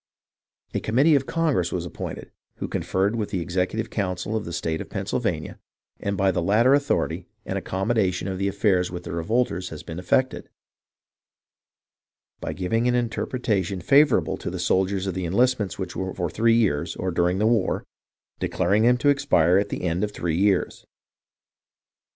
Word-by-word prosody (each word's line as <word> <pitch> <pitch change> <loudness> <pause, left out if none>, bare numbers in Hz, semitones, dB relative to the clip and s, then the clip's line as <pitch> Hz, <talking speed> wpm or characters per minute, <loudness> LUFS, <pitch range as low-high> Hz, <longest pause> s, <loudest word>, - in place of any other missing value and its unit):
A - - 0
committee 135 +9 +3
of 135 -2 +2
Congress 150 - +1
was 90 -1 -2
appointed, 85 - -7 0.2
who - - -4
conferred 100 +4 0
with 110 -3 -2
the 95 -3 -2
executive 90 +6 -2
council 95 +1 -2
of 110 - -2
the 85 - -6
state 80 -1 -2
of - - -8
Pennsylvania, - - -3 0.4
and 100 -1 -2
by 95 0 +3
the 90 -1 -1
latter 110 +9 +4
authority 140 0 0 0.2
an - - -3
accommodation 95 -1 0
of 95 -1 -3
the 100 - 0
affairs 100 -2 +1
with 90 0 -6
the - - -6
revolters 90 +2 -1
has 80 - -8
been 80 +1 -7
effected, 130 +8 0 1.9
by - - -4
giving 115 +6 0
an 125 - +2
interpretation 110 -5 -1
favourable 140 - +4
to - - -5
the - - -5
soldiers 95 +1 +1
of 95 - -2
the 90 0 -3
enlistments 105 -1 +1
which 95 -2 -5
were 95 +1 -3
for 85 -3 -2
three 115 +1 +3
years 100 -11 +1
or 95 0 -2
during 90 +1 +1
the 105 - +1
war, 110 -4 +1 0.6
declaring 95 +4 +1
them 125 +2 +4
to 145 +4 +2
expire 90 - +4
at 100 - -2
the - - -4
end 90 +2 0
of 105 - 0
three 85 -5 -2
years. 95 +1 +1
95 Hz, 170 wpm, -24 LUFS, 90-115 Hz, 1.9 s, latter